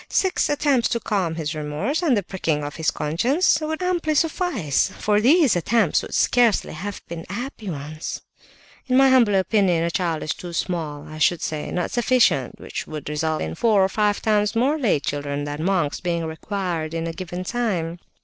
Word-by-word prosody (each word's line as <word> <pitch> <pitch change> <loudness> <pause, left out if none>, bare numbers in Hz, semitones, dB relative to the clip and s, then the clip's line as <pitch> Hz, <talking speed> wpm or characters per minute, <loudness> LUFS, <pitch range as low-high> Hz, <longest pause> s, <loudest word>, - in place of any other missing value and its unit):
Six 380 -4 +1
attempts 285 -4 +2
to 235 - 0
calm 190 -8 -1
his 160 -1 -3
remorse, 155 - -2
and 290 -10 +3
the 200 - 0
pricking 165 -5 -2
of 145 +2 -6
his 160 -2 +1
conscience, 255 - +1
would 315 +3 -3
amply 345 -4 0
suffice, 295 - +1
for 210 0 +2
these 285 - +5
attempts 195 +1 +2
could - - -5
scarcely 240 -4 +3
have 195 +6 -6
been 165 -1 -6
happy 225 0 -5
ones. 155 0 -5 0.7
In 255 0 +3
my 270 0 +6
humble 240 -6 +5
opinion, 190 -3 +2
a 170 - 0
child 170 -4 -1
is 155 - -1
too 175 -1 -9
small; 160 -4 -3
I 155 0 -9
should 170 +2 +2
say, 155 -1 -3
not 180 - -2
sufficient; 245 +1 +2
which - - -6
would 155 -2 -6
result 155 +1 -1
in 80 0 -4
four 210 - +3
or 190 - +2
five 210 0 0
times 210 0 +2
more 275 +7 +2
lay 220 - +2
children 145 +1 -3
than 145 +1 -4
monks 175 -6 0
being 170 -2 -2
required 165 -1 -3
in 165 0 -2
a 165 - -3
given 180 0 -5
time. 185 -7 -2
185 Hz, 190 wpm, -23 LUFS, 160-240 Hz, 0.7 s, my